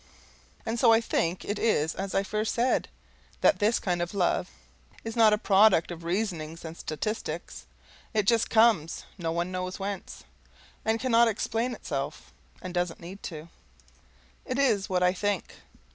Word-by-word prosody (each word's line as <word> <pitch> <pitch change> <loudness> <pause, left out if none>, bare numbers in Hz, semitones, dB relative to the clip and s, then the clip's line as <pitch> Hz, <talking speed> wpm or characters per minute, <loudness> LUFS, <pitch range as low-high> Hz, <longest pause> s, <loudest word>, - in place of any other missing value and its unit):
And 230 +1 -2
so 230 -1 +6
I 225 - +6
think 180 -6 -1
it 205 +1 -2
is 160 -8 +2
as 195 0 -4
I 195 - +3
first 215 +2 -2
said: 245 +2 +1 0.5
that - - +4
this 215 +3 +3
kind 175 -2 -1
of 175 +3 -3
love 180 -3 +1 0.5
is 225 0 -5
not 225 -2 +6
a 210 - +3
product 200 -5 +4
of 170 -1 -8
reasonings 170 -3 -3
and 160 0 -7
statistics. 155 - -5 0.4
It 215 - +1
just 225 +1 +3
COMES 220 -8 +3
none 170 +1 -2
knows 185 0 -3
whence 195 -1 -6 0.6
and 220 +1 +1
cannot 235 -2 +4
explain 225 +3 -1
itself. - - -5 0.3
And 185 -1 -6
doesn't 175 -1 -1
need 185 +4 -10
to. 160 -1 -7 0.9
It 255 - -3
is 225 -8 +2
what 180 -1 +1
I 180 0 +4
think. 205 0 -2
195 Hz, 160 wpm, -28 LUFS, 175-225 Hz, 0.9 s, so